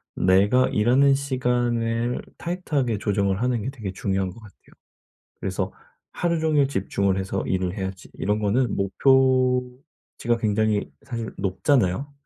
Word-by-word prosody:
내가 100 +8 +3
일하는 130 +6 +4
시간을 120 -3 -1 0.2
타이트하게 150 - -1
조정을 100 -2 0
하는 125 -3 0
게 125 - -2
되게 110 -8 -6
중요한 95 0 -1
것 105 - -14
같아요. 110 -3 -16 0.8
그래서 95 0 -3 0.4
'하루 170 -2 -1
종일 155 -3 +3
집중을 95 -4 0
해서 95 0 -2
일을 95 0 -1
해야지.' 95 -1 -6
이런 105 +1 -1
거는 110 +3 +1
목표치가 125 +2 +1
굉장히 110 -1 0
사실 115 -4 -5
높잖아요? 105 +5 +1
115 Hz, 305 characters per minute, -24 LUFS, 100-130 Hz, 0.8 s, 일하는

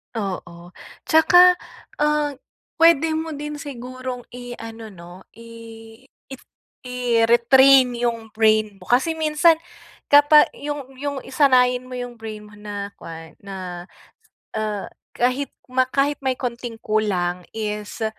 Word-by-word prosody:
Oo. 180 -4 -6 0.3
Tsaka, 355 +3 +6 0.4
ah, 300 0 +1 0.5
puwede 325 -1 +5
mo 315 0 -3
din 295 +1 -6
sigurong 255 -2 -7
iano 230 -2 -9
'no, 175 -2 -13
i 230 -1 -13 0.2
it 265 - -8 0.5
i-retrain 250 +2 +4
'yung 235 -2 -3
brain 215 -2 +2
mo. 180 - -15
Kasi 260 +7 +2
minsan 320 +1 +3 0.5
kapa 290 +1 +6
'yung 285 -2 -6
'yung 285 -1 -3
sanayin 255 -2 +3
mo 255 0 -7
'yung 245 -1 -6
brain 215 -2 -9
mo 210 - -16
na 205 -1 -7
kuwan 165 -1 -11
na, 185 -3 -7 0.7
ah, 215 -2 -3 0.3
kahit 255 +3 0 0.2
ma 255 0 +2
kahit 280 +2 0
may 260 -2 -1
konting 240 -2 -5
kulang 180 -5 -1
is 210 +1 -4
245 Hz, 120 wpm, -22 LUFS, 215-280 Hz, 0.7 s, Tsaka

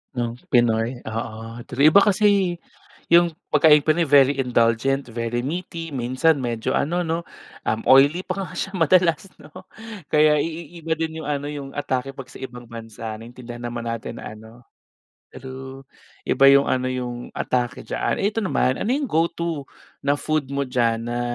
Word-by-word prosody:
Ng 120 0 -2 0.2
Pinoy, 120 +1 +2
oo 115 0 -6
tri 140 +5 +4
iba 180 - +5
kasi 200 -3 +3 0.5
yung 170 -1 +5 0.2
pagkaing 150 0 +6
Pinoy 160 +3 +2
very 140 -1 +5
indulgent, 125 +1 +1
very 115 +1 -2
meaty, 165 +3 -5
minsan 130 +4 +1
medyo 120 -3 -3
ano 175 +5 0
'no, 165 0 -2 0.4
um, 110 +1 0
oily 140 +7 +6
pa 190 +1 -4
nga - - -11
siya 190 -1 -4
madalas 170 +1 +3 0.2
'no, 150 - -14 0.6
kaya 150 0 +5
iiba 165 +1 -3
din 160 0 -3
yung - - -8
ano 145 0 -2
yung 140 -2 -7
atake 135 -1 -2
pag 135 -2 -10
sa - - -11
ibang 125 -2 -9
bansa 115 -1 -7
naintindihan 120 +1 -9
naman 120 -1 -4
natin 115 -1 -5
na 110 - -8
ano 110 +2 -15 0.7
true, 130 +1 -9 0.5
iba 135 - +4
yung 140 0 +7
ano 130 0 0
yung 125 -1 -4
atake 125 -1 -1
diyaan. - - -2
Ito 210 +2 0
naman, 130 -7 +1
ano - - -2
yung 295 - -2
go 165 +1 +3
to 165 -5 -4 0.4
na 140 - +4
food 155 0 -1
mo 140 - 0
diyan 120 -3 0
na 120 +1 -3
135 Hz, 165 wpm, -22 LUFS, 120-160 Hz, 0.7 s, yung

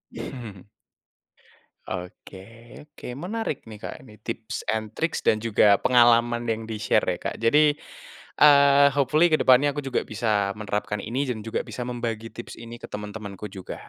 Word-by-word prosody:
Hmm. 105 -7 -8 1.2
Oke 95 +1 -8 0.4
oke, 150 - -13
menarik 180 - -4
nih, 110 -2 -11
Kak, - - -7
ini 105 0 -16
tips 115 0 -6
and 110 -1 -2
tricks 165 +8 -2
dan 110 - +3
juga 105 -2 +4
pengalaman 120 -1 +4
yang 115 -1 -3
di-share 110 -2 0
ya, - - -10
Kak, - - -7
jadi, 150 +6 +4 0.7
eee, 140 -1 +7
hopefully 150 +5 +3
ke 155 - +3
depannya 130 +3 +5
aku 140 - -7
juga 135 -3 -2
bisa 105 -3 -1
menerapkan 105 0 -3
ini 120 +7 -3
dan 115 -3 -3
juga 115 - -2
bisa 125 -1 -6
membagi 115 -2 -4
tips 120 - -9
ini 115 0 -9
ke - - -9
teman-temanku 105 -1 -7
juga. 95 -3 -9
115 Hz, 155 wpm, -25 LUFS, 105-135 Hz, 1.2 s, eee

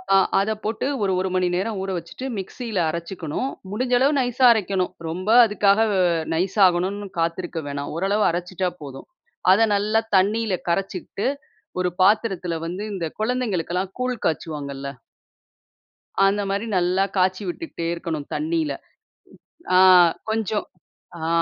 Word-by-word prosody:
ஆ - - +7 0.2
அத 210 +3 0
போட்டு 220 +4 -2 0.2
ஒரு 190 -1 +1
1 190 0 -1
மணி 180 -1 +2
நேரம் 200 +3 -2
ஊற 195 - -4
வச்சுட்டு 170 +10 -7
மிக்ஸியில 215 +1 -4
அரைச்சிக்கணும், 170 - -4 0.2
முடிஞ்ச 250 +4 -1
அளவு 280 +2 +3
நைஸா 250 0 +2
அரைக்கணும். 190 -4 -1 0.2
ரொம்ப 185 +5 -4 0.2
அதுக்காக 210 -1 +3
வ - - +1 0.4
நைஸாகணும்னு 190 +2 +2
காத்திருக்க 170 0 -2
வேணாம். 140 0 -4
ஓரளவு 200 +3 +1
அரைச்சிட்டா 180 +1 -2
போதும். 135 -2 -9 0.5
அத 200 - +3 0.2
நல்லா 215 +2 +1 0.2
தண்ணியில 210 +2 +1 0.2
கரைச்சுகிட்டு 195 +4 -2 0.5
ஒரு 180 - +1
பாத்திரத்தில 190 -4 +2
வந்து 185 +4 -5
இந்த 175 -4 -3 0.2
கொழந்தைங்களுக்கெல்லாம் 195 -6 -1
கூழ் 250 -1 -1
காய்ச்சுவாங்கல்ல. 140 -4 -3 1.4
அந்த 205 +1 +1
மாரி 200 +3 -1
நல்லா 180 +2 +2
காய்ச்சி 185 +2 +2
விட்டுகிட்டே 175 - -5
இருக்கணும் 160 -4 -5
தண்ணியில. 320 -1 -1 0.9
ம். - - -16
ஆ - - +7 0.5
கொஞ்சம் 220 -1 -1 0.5
ஆ. 160 0 -3
190 Hz, 130 wpm, -23 LUFS, 175-215 Hz, 1.4 s, ஆ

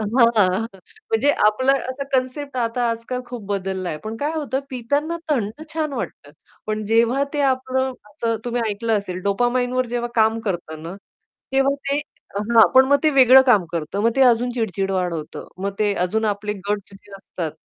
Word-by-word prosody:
हां, 230 +3 +4
हां 190 -1 +3 0.5
म्हणजे 370 -11 +3 0.2
आपलं 260 +6 +3
असं 275 0 -3
कन्सेप्ट 260 +1 -1
आता 235 0 0
आजकाल 230 +2 -4
खूप 240 -3 -7
बदलला 190 -2 -2
आहे. 155 - -4
पण 220 +1 -5
काय 300 +2 -1
होतं 275 -4 -2
पिताना 285 +7 -1
थंड 235 +1 -1
छान 310 -3 -1
वाटतं. - - -6 0.4
पण 215 0 -2
जेव्हा 230 +5 +3
ते 290 - 0
आपलं 260 0 -1 0.2
असं 230 +2 -2
तुम्ही 240 0 -1
ऐकलं 220 +2 0
असेल 185 -2 -6
डोपामाइनवर 245 +4 +1
जेव्हा 240 0 -2
काम 220 0 +3
करतं 170 -7 -4
ना, 170 +3 -7 0.6
तेव्हा 270 +1 +3 0.2
ते 280 - +1 0.4
हां. 225 +1 +5
पण 260 0 +8
मग 285 +1 +4
ते 310 - +5
वेगळं 265 -1 +8
काम 205 -7 +5
करतं, 165 +4 -3
मग 230 - +4
ते 270 - +3
अजून 240 +2 0
चिड-चिड 195 -5 -2
वाढवत, 175 -5 -3 0.2
मग 195 +1 -3
ते 210 -1 +2
अजून 220 +4 -1
आपले 210 0 -1 0.2
गट्स 205 -1 -3
जे 200 +1 -17
असतात 175 -5 -5
230 Hz, 175 wpm, -21 LUFS, 200-260 Hz, 0.6 s, पण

